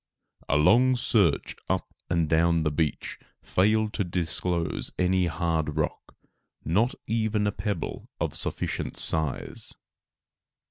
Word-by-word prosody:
A 70 - +3
long 125 +12 +5
search 105 - +1
up - - -2 0.2
and 85 -2 +1
down 85 +1 +2
the 75 - 0
beach 75 0 -2 0.2
failed 110 +3 +1
to 100 - 0
disclose 85 -1 -2
any 90 0 +2
hard 80 -3 -1
rock, 75 - -3 0.5
not 105 - +1
even 110 -1 0
a 100 - +1
pebble 105 0 -4
of - - -1
sufficient - - -3
size. 80 -4 +2
90 Hz, 120 wpm, -26 LUFS, 80-105 Hz, 0.5 s, long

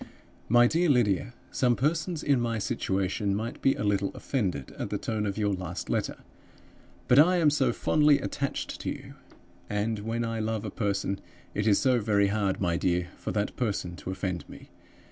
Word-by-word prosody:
"MY 120 +1 +6
DEAR 165 +6 +2
LYDIA 120 - +2 0.2
Some 125 -2 +2
persons 155 +4 -1
in 140 -4 +3
my 115 -1 -1
situation 100 0 -1
might 110 +3 -4
be 135 - +3
a - - -3
little 100 -1 +1
offended 95 - -2
at - - -3
the - - -1
tone 110 -2 -2
of 100 - -3
your 105 -2 +1
last 90 -1 -5
letter. - - -1 0.9
But 125 - +6
I 180 +5 +6
am 155 -4 +4
so 150 - +2
fondly 150 -2 +3
attached 140 0 -3
to - - -3
you! - - -7 0.6
And 105 +1 -1
when 115 +3 -2
I 115 0 -2
love 110 -1 -2
a 105 - -4
person, 100 -2 -1 0.3
it 105 +1 -1
is 100 - +5
so 130 -2 +3
very 100 -2 +2
hard, 100 -2 0
my 85 -3 +1
dear, 90 0 0
for - - -5
that 105 -1 -1
person 100 -7 -2
to - - -7
offend 95 -2 -3
me! - - -13
110 Hz, 185 wpm, -28 LUFS, 100-125 Hz, 0.9 s, MY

